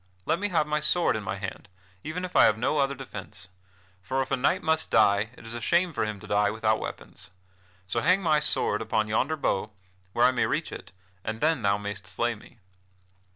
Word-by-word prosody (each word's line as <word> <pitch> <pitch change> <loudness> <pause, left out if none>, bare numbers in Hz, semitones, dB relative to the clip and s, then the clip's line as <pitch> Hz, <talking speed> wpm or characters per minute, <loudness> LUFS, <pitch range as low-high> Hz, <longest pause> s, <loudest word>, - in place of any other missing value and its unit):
Let 170 - +1
me 205 +1 -1
have 165 -5 +2
my 150 0 0
sword 165 0 +2
in 110 - -2
my 95 - -3
hand, 95 0 -7 0.3
even 180 +4 -4
if 180 - -10
I - - +8
have 110 - +3
no 135 +6 0
other 140 0 +1
defence. 130 -8 -8 0.5
For 130 +8 -1
if 130 - -12
a - - +4
knight 140 +8 +1
must 160 0 +1
die, 105 -1 +4
it - - -14
is 115 - -6
a 120 - -5
shame 170 +7 +2
for 135 - 0
him 105 -1 -5
to - - -10
die 105 0 +2
without 110 0 +1
weapons. - - -8 0.6
So 95 - -1
hang 185 +2 +3
my 155 -3 +3
sword 105 -7 +2
upon 110 -1 0
yonder 130 +9 0
bough, 105 -7 -1 0.4
where 120 - +4
I 130 - +6
may 125 - +1
reach - - -2
it, - - -9 0.3
and 110 +1 -4
then 155 -2 +2
thou 100 -1 +2
mayst 100 -2 -6
slay 120 +5 -1
me." 110 +2 -16
120 Hz, 220 wpm, -27 LUFS, 105-155 Hz, 0.6 s, I